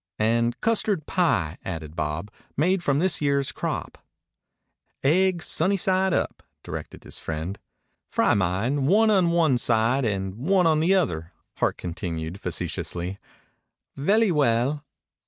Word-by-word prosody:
"And 115 +2 +1
custard 215 -7 +1
pie," 90 - 0
added 80 -4 -6
Bob. 80 +5 -3 0.3
"Made 180 +6 +2
from 140 -5 +1
this 180 +2 +2
year's 140 -1 +1
crop." - - -4 1.0
"Aigs 175 +4 +3
sunny 190 +5 +1
side 190 0 +2
up," - - -1 0.2
directed - - -7
his - - -6
friend. 80 +5 -5 0.5
"Fry - - +2
mine 100 +9 0
one 215 +5 +4
on 185 -4 +3
one 160 -7 +3
side 115 +3 +2
and 95 -4 -1
one 180 +8 +2
on 160 -2 +4
the 175 +5 +3
other," 85 - -1 0.2
Hart - - 0
continued 85 0 -5
facetiously. 90 +1 -3 0.8
"Vely 205 +8 +3
well." 140 0 +1
135 Hz, 130 wpm, -25 LUFS, -, 1.0 s, one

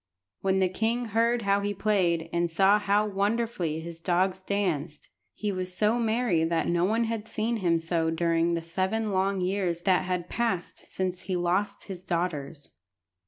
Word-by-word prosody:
When 190 0 +1
the 190 -1 +3
king 225 +6 -1
heard 230 +1 +2
how 200 0 +3
he 205 0 -2
played, 180 -5 +1
and 170 0 +1
saw 195 +5 +4
how 205 +1 +2
wonderfully 200 -5 -1
his 165 0 -8
dogs 185 +2 +1
danced, 175 -7 -2 0.3
he 210 -1 -2
was 185 -1 -4
so 220 +3 +2
merry 225 -7 +1
that 165 0 0
no 175 0 +2
one 225 +4 +1
had 225 -1 -3
seen 225 +2 -1
him 170 -5 +2
so 165 0 0
during 165 +1 +1
the 165 - -3
seven 190 +6 -1
long 190 0 +1
years 180 -2 -1
that 185 -1 +3
had 180 -1 -2
passed 225 -7 -3
since 185 -1 -2
he 185 - +1
lost 185 +4 0
his 185 -3 -7
daughters. 160 -5 -3
185 Hz, 170 wpm, -27 LUFS, 170-210 Hz, 0.3 s, saw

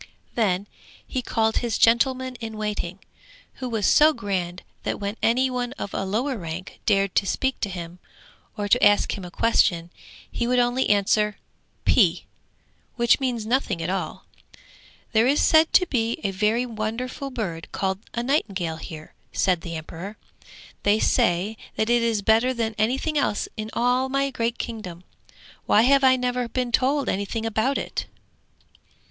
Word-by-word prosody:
Then 200 -4 +1 0.4
he 260 - -3
called 225 -2 0
his 235 -3 0
gentleman 255 +2 +3
in 220 -2 -6
waiting, 210 -4 -3 0.6
who 255 - -3
was 220 -4 -1
so 310 +1 +6
grand 185 -6 -3 0.2
that - - -3
when 200 +1 -3
any 250 +3 +3
one 250 0 -2
of 200 - -6
a 195 - -2
lower 240 +7 -1
rank 170 +2 -7
dared 195 -3 +2
to 195 - +2
speak 265 +6 -1
to 205 - -2
him, 175 -1 -7 0.6
or 205 -1 -2
to 245 +5 +3
ask 205 0 +4
him 195 - -7
a 180 - -7
question, 175 -5 +2 0.4
he 235 - -2
would 250 +1 +2
only 245 +1 +2
answer 210 +1 +2 0.5
'P,' - - +3 0.7
which 235 -1 +3
means 245 -5 -2
nothing 225 -6 0
at 165 +2 -2
all. 190 - -4 0.9
'There 225 +2 +4
is 280 +3 +3
said 315 0 +5
to 365 - +6
be 235 -7 -1
a 200 - 0
very 215 +5 +1
wonderful 240 +4 -4
bird 190 -10 -5
called 190 -1 -1 0.2
a 235 - -1
nightingale 200 - -1
here,' 155 -1 -9 0.2
said 180 -3 +1
the 170 -1 -6
emperor. 165 +6 -7 0.6
'They 205 +1 +3
say 195 +1 +1 0.2
that 220 +2 0
it 240 0 +4
is 225 -3 0
better 230 +5 +3
than 225 -2 -1
anything 265 +7 +1
else 205 -7 0
in 215 0 -5
all 250 +2 +1
my 275 +1 0
great 235 -1 -1
kingdom! 185 -7 -6 0.6
Why 215 - +5
have 275 +2 +4
I 260 -1 +6
never 250 -1 -1
been 250 0 -2
told 270 +4 +2
anything 200 +3 -2
about 225 +5 +1
it?' - - -4
225 Hz, 165 wpm, -24 LUFS, 195-250 Hz, 0.9 s, so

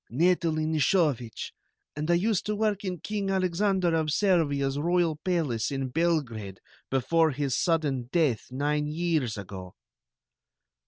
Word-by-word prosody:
"Natalie 160 +2 +1
Nishovich, 150 - 0 0.4
and 150 +2 -3
I 175 - +5
used 200 +2 +1
to 210 - 0
work 210 -1 0
in 180 -4 -4
King 205 -2 -3
Alexander 185 -1 +1
of 160 -1 +1
Servia's 145 -7 +1
royal 170 0 +1
palace 155 - -1
in 135 -2 -3
Belgrade 125 - -1 0.3
before 160 +5 +2
his 140 -2 -1
sudden 145 -8 0
death 150 - +1
nine 150 +3 -1
years 155 -7 -1
ago." 95 -2 -8
155 Hz, 125 wpm, -27 LUFS, 135-175 Hz, 0.4 s, I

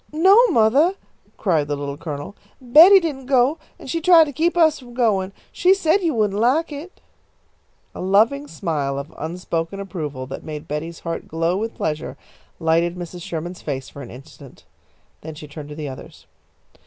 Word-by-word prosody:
"No, 355 +6 +5
mothah," 275 - +3 0.4
cried 160 -8 +1
the 145 - -1
Little 140 0 -5
Colonel, 150 +3 -7 0.2
"Betty 315 +11 +8
didn't 285 -7 -5
go, 270 +3 +3 0.2
and - - -12
she 330 +5 -2
tried 340 -1 +7
to 300 - -4
keep 335 +5 0
us 315 -3 +4
from 245 -2 -14
goin'. 200 -6 +1 0.2
She 370 +2 +3
said 385 +1 +2
you 330 -6 0
wouldn't 210 -2 0
like 275 +9 +2
it." 300 +6 -9 0.9
A - - -7
loving 220 +10 +2
smile 145 - -3
of 140 +3 -7
unspoken 165 +2 -4
approval, 155 -9 -5
that 130 - -8
made 150 -1 -7
Betty's 165 +3 -5
heart 165 -1 -5
glow 165 +2 -1
with 220 +3 -3
pleasure, 155 -1 -3 0.4
lighted 165 +2 +1
Mrs. 175 0 -8
Sherman's 170 +2 -6
face 130 -1 -5
for 140 - -11
an 125 - -9
instant. 135 +1 -14 0.6
Then 160 0 -8
she 150 0 -10
turned 150 0 -9
to 150 - -8
the 150 -1 -5
others. 130 - -11
185 Hz, 175 wpm, -21 LUFS, -, 0.9 s, Betty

